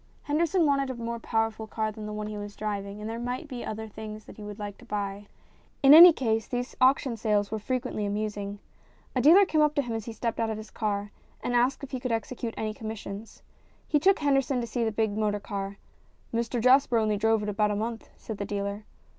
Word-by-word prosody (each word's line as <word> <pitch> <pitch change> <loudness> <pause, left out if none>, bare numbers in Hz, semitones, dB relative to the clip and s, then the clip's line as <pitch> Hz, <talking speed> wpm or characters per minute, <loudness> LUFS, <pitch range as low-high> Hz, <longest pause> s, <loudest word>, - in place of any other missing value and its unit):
Henderson 330 +3 +2
wanted 275 -2 +2
a 260 - -3
more 235 0 -4
powerful 225 -1 -1
car 215 0 -2
than 215 0 -8
the - - -5
one 210 0 -4
he 215 0 -5
was 205 0 -7
driving, 205 -1 -4
and 210 - -5
there 225 +1 -4
might 250 +6 -4
be 250 -4 -6
other 220 +1 -5
things 215 0 -8
that - - -12
he - - -10
would 210 -1 -7
like 205 -1 -6
to - - -14
buy. 205 0 -4 0.6
In 275 +1 +9
any 345 +3 +12
case 225 -7 -1
these 245 +1 -3
auction 260 -1 +4
sales 210 -2 0
were 220 - -2
frequently 250 -2 -2
amusing. 205 -1 -3 0.6
A 255 - +2
dealer 350 +9 +7
came 310 -4 +2
up 300 -1 +3
to 285 - +2
him 240 -2 -4
as 225 -1 -4
he 230 - -5
stepped 230 +1 -3
out 225 -1 +1
of 220 - -3
his 215 0 -9
car 205 -1 -2 0.3
and 245 - -1
asked 250 +4 +2
if 275 - -7
he 260 - -3
could 250 0 -3
execute 230 +1 -3
any 215 -1 -2
com 220 0 -8
missions. 215 0 -7 0.4
He 300 - +3
took 390 +6 +4
Henderson 275 -3 +1
to 240 - -2
see 235 0 -2
the 225 - +1
big 220 0 0
motor 210 -1 0
car. 200 -1 -5 0.3
" - - -35
Mr 235 +1 -1
Jasper 255 0 +5
only 215 -2 +1
drove 225 0 +2
it 210 - -2
about 210 +1 +1
a 210 - 0
month," 225 +2 -4
said 215 -3 -7
the - - -1
dealer. 200 0 -4
225 Hz, 240 wpm, -28 LUFS, 210-250 Hz, 0.6 s, any